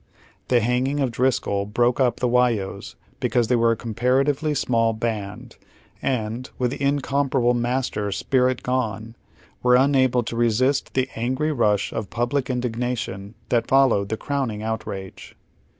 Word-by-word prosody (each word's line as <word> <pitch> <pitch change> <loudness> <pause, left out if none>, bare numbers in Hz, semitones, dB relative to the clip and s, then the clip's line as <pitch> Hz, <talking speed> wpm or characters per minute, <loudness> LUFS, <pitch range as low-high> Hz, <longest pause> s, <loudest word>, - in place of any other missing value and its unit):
The 125 -2 +3
hanging 125 +5 0
of 135 -3 0
DriscoU 115 -5 0
bi 120 - +3
oke 120 +1 +2
up 125 -3 +2
the 125 - +1
"Whyos 120 -5 0 0.2
because 120 -2 +1
they 125 - +4
were 115 0 +3
a - - -6
comparatively 135 +7 0
small 115 -3 +1
band, 110 -3 -5 0.4
and, 120 -1 -2
with 125 -1 0
the 140 - -6
incomparable 140 -3 +1
master 120 -4 -1
spirit 130 +3 +1
gone, 115 -3 -2 0.5
were 125 0 +4
unable 130 -2 +3
to 115 - -5
I'esist 120 +4 +1
the 130 0 +1
angry 130 +7 -1
rush 105 -7 +1
of 110 -3 -4
public 125 +3 -1
in 125 -1 0
dignation 115 -4 -4
that 120 -1 +1
followed 130 -7 +3
the 110 - -2
crowning 125 -7 -3
outrage. 100 -4 -6
125 Hz, 150 wpm, -23 LUFS, 115-130 Hz, 0.5 s, they